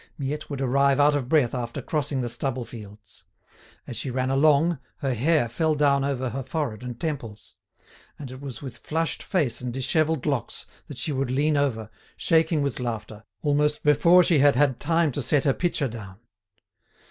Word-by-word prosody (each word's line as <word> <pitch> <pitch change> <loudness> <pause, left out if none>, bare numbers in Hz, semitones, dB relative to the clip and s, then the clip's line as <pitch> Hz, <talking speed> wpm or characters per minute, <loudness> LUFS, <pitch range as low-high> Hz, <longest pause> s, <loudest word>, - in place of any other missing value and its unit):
Miette 145 +2 -4
would 140 -2 -4
arrive 140 +1 +2
out 145 +1 +5
of 135 -4 -2
breath 145 -6 +3
after 120 -2 -4
crossing 145 -3 -2
the 120 - -2
stubble 125 +1 -3
fields; 105 -3 -12 0.6
as - - -7
she - - -3
ran 130 +1 -1
along, 150 +3 +3 0.2
her 135 -2 -1
hair 145 +2 +2
fell 155 +7 0
down 140 -2 +3
over 130 -2 -1
her 135 +4 -4
forehead 130 -5 -3
and 125 -2 -7
temples; 130 -10 -5 0.6
and 135 -4 -8
it 130 +1 -10
was 135 -3 -8
with 130 -3 -7
flushed 165 +1 -2
face 150 - -1
and 125 -1 -3
dishevelled 155 +2 0
locks 140 -7 -2 0.2
that 145 - -9
she 150 - -1
would 135 -2 -1
lean 145 +4 +1
over, 130 -7 0 0.3
shaking 160 -2 +2
with 140 -4 -2
laughter, 110 -3 -5 0.2
almost 150 +1 +1
before 170 +5 +6
she 165 -4 +3
had 145 -1 +5
had 135 -2 +2
time 165 -2 +1
to 145 - -3
set 135 +3 +2
her 135 - +3
pitcher 170 -4 0
down. 105 -4 -9
140 Hz, 180 wpm, -25 LUFS, 125-150 Hz, 0.6 s, before